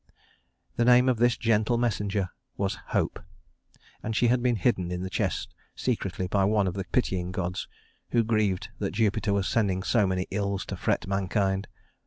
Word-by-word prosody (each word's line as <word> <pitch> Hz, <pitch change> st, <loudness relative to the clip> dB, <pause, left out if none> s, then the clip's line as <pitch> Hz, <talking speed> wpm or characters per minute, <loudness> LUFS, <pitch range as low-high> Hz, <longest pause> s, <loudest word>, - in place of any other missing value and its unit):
The 120 Hz, -, +3 dB
name 125 Hz, +1 st, +6 dB
of 125 Hz, -2 st, +3 dB
this 120 Hz, +1 st, +3 dB
gentle 115 Hz, 0 st, +2 dB
messenger 105 Hz, -5 st, 0 dB, 0.3 s
was 100 Hz, 0 st, -1 dB
Hope; -, -, 0 dB, 0.8 s
and 110 Hz, 0 st, -3 dB
she 120 Hz, -, +3 dB
had 125 Hz, 0 st, +3 dB
been 120 Hz, -1 st, +2 dB
hidden 95 Hz, -4 st, +1 dB
in 90 Hz, 0 st, -3 dB
the 95 Hz, -, -5 dB
chest -, -, -2 dB, 0.2 s
secretly 95 Hz, -, -2 dB
by 100 Hz, +1 st, +2 dB
one 105 Hz, 0 st, +3 dB
of 90 Hz, -, -1 dB
the 95 Hz, -1 st, -4 dB
pitying 90 Hz, -8 st, -1 dB
gods, 90 Hz, 0 st, -3 dB, 0.4 s
who 120 Hz, -1 st, +3 dB
grieved 105 Hz, -3 st, 0 dB
that 100 Hz, -, -2 dB
Jupiter 110 Hz, -1 st, +1 dB
was 100 Hz, -1 st, +1 dB
sending 95 Hz, -5 st, +1 dB
so 105 Hz, -1 st, +3 dB
many 95 Hz, 0 st, -1 dB
ills 100 Hz, 0 st, -1 dB
to -, -, -5 dB
fret -, -, 0 dB
mankind. 95 Hz, 0 st, 0 dB
100 Hz, 175 wpm, -27 LUFS, 95-115 Hz, 0.8 s, name